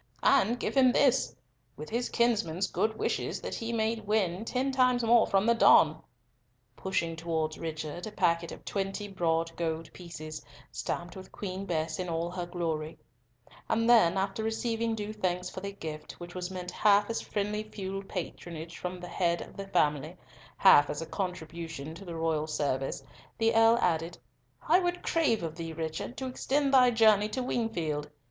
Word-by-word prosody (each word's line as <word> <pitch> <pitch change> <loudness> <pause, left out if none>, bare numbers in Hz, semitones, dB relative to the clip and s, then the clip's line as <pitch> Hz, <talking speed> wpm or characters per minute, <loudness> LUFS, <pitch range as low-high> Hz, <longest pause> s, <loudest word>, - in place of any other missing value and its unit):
"And 245 -3 +4
give - - -2
him 260 -2 +6
this, 265 0 +3 0.4
with 155 +1 -8
his 240 +2 -1
kinsman's 205 -7 +1
good 220 0 -1
wishes - - -1
that - - -5
he 230 0 -3
may 225 0 0
win 205 -3 0
ten 260 +3 0
times 255 -2 +3
more 230 0 +5
from 195 +1 +2
the 235 - +5
Don," 230 - +5 0.7
pushing 170 -3 -1
towards 160 -1 -2
Richard 160 +2 -5
a - - -6
packet 170 -3 +1
of - - -10
twenty 195 +1 -3
broad 165 -3 -1
gold 160 -1 -3
pieces, 155 -3 -8 0.3
stamped 170 +8 -4
with 190 -1 -10
Queen 195 0 -5
Bess 160 -1 -2
in 180 -1 -3
all 165 +1 -2
her 180 -1 -4
glory; 165 -3 -3 0.7
and 230 +1 +2
then, 205 -7 +6
after 195 +3 -1
receiving 225 +1 -1
due 210 0 -4
thanks 180 -3 -2
for - - -6
the 200 +1 -5
gift, 155 -5 -7
which 175 0 -10
was 180 0 -4
meant 180 -1 -6
half 205 +1 +4
as 230 - -2
friendly 210 +1 -2
feudal 195 -2 -5
patronage 170 -3 -6
from 180 0 -4
the 180 - -8
head 170 -2 0
of - - -15
the 195 -1 -6
family, 150 -1 +1 0.4
half 145 -7 +7
as 150 +2 -3
a - - -6
contribution 165 -5 -5
to 195 +4 -11
the 170 -2 -6
royal 160 -1 0
service, 140 -3 -2 0.3
the 225 0 +2
Earl 225 +1 +6
added, 165 -3 0 0.5
"I 360 - +6
would 355 -1 -2
crave 290 - +1
of 160 -2 -3
thee, 165 -1 -5
Richard, 160 - -4
to 265 - -4
extend 275 +2 0
thy 255 -2 +7
journey 215 -3 +4
to 255 +4 -2
Wingfield. 170 -12 -2
185 Hz, 175 wpm, -30 LUFS, 165-225 Hz, 0.7 s, half